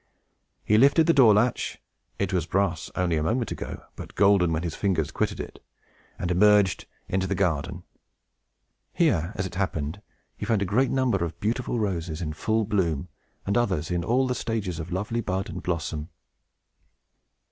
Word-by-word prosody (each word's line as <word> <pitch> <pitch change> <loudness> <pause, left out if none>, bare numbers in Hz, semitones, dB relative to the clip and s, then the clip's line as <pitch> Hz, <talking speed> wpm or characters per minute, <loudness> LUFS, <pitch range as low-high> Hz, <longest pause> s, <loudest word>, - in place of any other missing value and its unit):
He 105 +1 +4
lifted 140 +5 +5
the 165 - +4
door 120 -8 +7
latch 120 +3 0 0.4
(it 100 -1 -1
was 85 -3 0
brass 95 -5 0
only 90 -3 +1
a - - 0
moment 115 +8 0
ago, - - -6
but - - -10
golden 100 -3 +4
when 80 +1 -1
his 85 -3 -3
fingers 80 -6 0
quitted - - -1
it), - - -8 0.5
and 90 - -2
emerged 100 0 +4 0.2
into 95 0 0
the 100 - -1
garden. 85 -6 -1 1.1
Here, 95 - +2
as 95 - -2
it 95 - -6
happened, 90 -2 -2 0.3
he - - -5
found 110 -4 +2
a - - -1
great 120 +7 +2
number 125 -9 +1
of 85 0 -5
beautiful 120 +3 -1
roses 85 -7 -2
in 80 -3 -3
full 110 +6 0
bloom, 90 -7 0 0.4
and 100 - 0
others 95 -10 0
in 85 -1 0
all 125 +7 +2
the 125 - 0
stages 105 -8 -3
of 80 +3 -6
lovely 105 +6 -2
bud 95 -2 -2
and - - -6
blossom. 80 -2 -3
95 Hz, 170 wpm, -26 LUFS, 85-110 Hz, 1.1 s, door